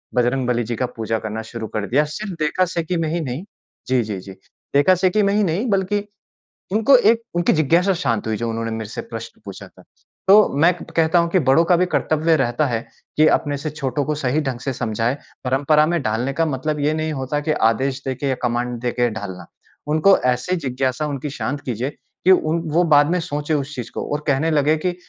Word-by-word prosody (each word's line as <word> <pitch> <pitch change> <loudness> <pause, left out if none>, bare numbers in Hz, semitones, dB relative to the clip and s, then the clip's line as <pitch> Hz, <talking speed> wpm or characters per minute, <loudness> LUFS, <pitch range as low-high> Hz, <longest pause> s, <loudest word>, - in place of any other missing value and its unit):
बजरंगबली 125 -1 +1
जी 115 +1 -3
का 125 - -1
पूजा 110 0 -1
करना 110 +1 -5
शुरू 115 -2 -5
कर 105 -1 -2
दिया। 140 +5 +3
सिर्फ़ 210 -3 -5
देखा 155 +4 +1
से 170 -1 -3
की 175 +2 -2
में 160 -1 -1
ही 170 +2 -1
नहीं, 135 +2 -4 0.4
जी, 130 -1 +2
जी, 105 -3 -5
जी। 95 +1 -10 0.4
देखा 165 +7 +5
से 185 +1 +2
की 210 +3 +2
में 200 0 +2
ही 210 +1 +2
नहीं 190 +7 0
बल्कि 200 +1 0 0.7
उनको 225 +6 +5
एक 230 -1 +3
उनकी 175 0 +2
जिज्ञासा 170 +5 +3
शाँत 115 - -1
हुई 110 -1 -1
जो 115 +1 -2
उन्होंने 115 0 -3
मेरे 110 -2 -5
से - - -5
प्रश्न 115 0 -9
पूछा 100 -2 -9
था। - - -19 0.4
तो 210 +2 +7
मैं 170 +4 +5
कहता 165 +1 +2
हूँ 170 0 +1
कि 185 - +3
बड़ों 160 +5 +5
का 180 - +5
भी 180 - +3
कर्तव्य 160 +1 +2
रहता 125 +2 +1
है 115 -2 -2 0.3
कि 155 +1 +6
अपने 145 -1 -4
से 145 +3 -4
छोटों 140 -2 -2
को 150 - -1
सही 145 +1 0
ढंग 135 -4 -3
से 135 - -2
समझाए, 115 +2 -1 0.3
परंपरा 145 +4 +3
में 170 -1 0
डालने 120 +4 -1
का 165 +3 +1
मतलब 150 +1 -2
ये 145 +2 +1
नहीं 155 0 -2
होता 135 +1 -2
कि - - +3 0.2
आदेश 135 +2 -2
देके 130 +1 -2
या 130 - +1
कमांड 120 0 -1
देके 120 0 0
ढालना। 100 -4 -7 0.4
उनको 155 +6 +4 0.2
ऐसे 125 +9 -2
जिज्ञासा 130 -2 -2
उनकी 145 0 -4
शाँत 145 +1 -3
कीजिए 125 +1 -2 0.4
कि 190 - +7
उन 165 -2 +3
वो 170 +3 +3
बाद 145 0 +5
में 180 - +1
सोचे 150 -2 -3
उस 145 0 -2
चीज़ 120 -3 -6
को - - -3
और 150 0 -2
कहने 145 +3 +2
लगे 150 0 +3
कि, 180 +3 -2
145 Hz, 220 wpm, -21 LUFS, 120-165 Hz, 0.7 s, तो